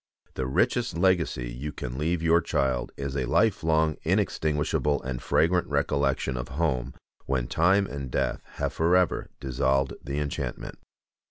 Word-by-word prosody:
The 65 - -2
richest 65 +4 +1
legacy 85 -9 +1
you 70 +5 -5
can 65 -3 -6
leave 80 +4 -1
your 85 +1 +4
child 65 -4 0
is 70 -1 -4
a 65 -2 0
life 105 - +2
long, 80 -1 +2
inextinguishable, 75 -1 +1
and 65 -1 -4
fragrant 90 +2 +2
recollection 70 -2 0
of - - -4
home 65 -6 0 0.3
when 65 -2 0
time 95 +9 +3
and 70 -6 -6
death - - -1
have - - -2
forever 90 +2 +2
dissolved 65 +1 +1
the 70 +1 -4
enchantment. 75 -1 -4
70 Hz, 145 wpm, -27 LUFS, 65-80 Hz, 0.3 s, your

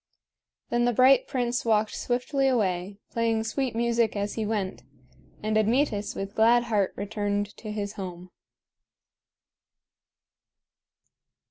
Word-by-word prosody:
Then 240 0 +2
the 245 - +2
bright 260 +3 +5
prince 245 -3 -1
walked 215 -2 +2
swiftly 270 +3 0
away, 195 -6 0
playing 230 -1 +1
sweet 245 +2 -2
music 235 -1 +1
as 205 0 -2
he 220 -2 -2
went; 205 -4 -2 0.6
and 215 0 0
Admetus 215 -2 +1
with 195 +1 -5
glad 235 +2 +4
heart 210 -5 +1
returned 205 0 -2
to 215 - -7
his 205 -1 -4
home. 180 -2 -7
220 Hz, 115 wpm, -27 LUFS, 205-240 Hz, 0.6 s, bright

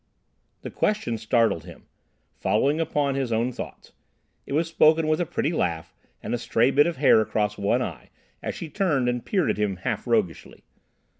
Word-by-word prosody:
The - - -6
question 165 - -1
startled 110 -7 +1
him, 85 -2 -13 0.5
following 150 +4 +1
upon 145 -3 0
his 135 -3 -2
own 115 +3 +1
thoughts. - - -9 0.6
It - - -5
was 160 +3 +1
spoken 160 -1 +4
with 155 +2 +1
a 175 - -1
pretty 155 +3 -1
laugh, 85 - -2 0.3
and - - -3
a 120 - -1
stray 120 +2 +2
bit 145 +3 +4
of 170 - -3
hair 130 -5 +5
across 105 -1 -1
one 105 +5 +1
eye, 80 - -7 0.3
as - - -4
she 170 - -6
turned 150 -7 0
and 125 -1 -1
peered 190 -5 +1
at - - -4
him 105 -2 0
half 90 +6 -4
roguishly. 110 -8 -1
125 Hz, 180 wpm, -25 LUFS, 110-155 Hz, 0.6 s, hair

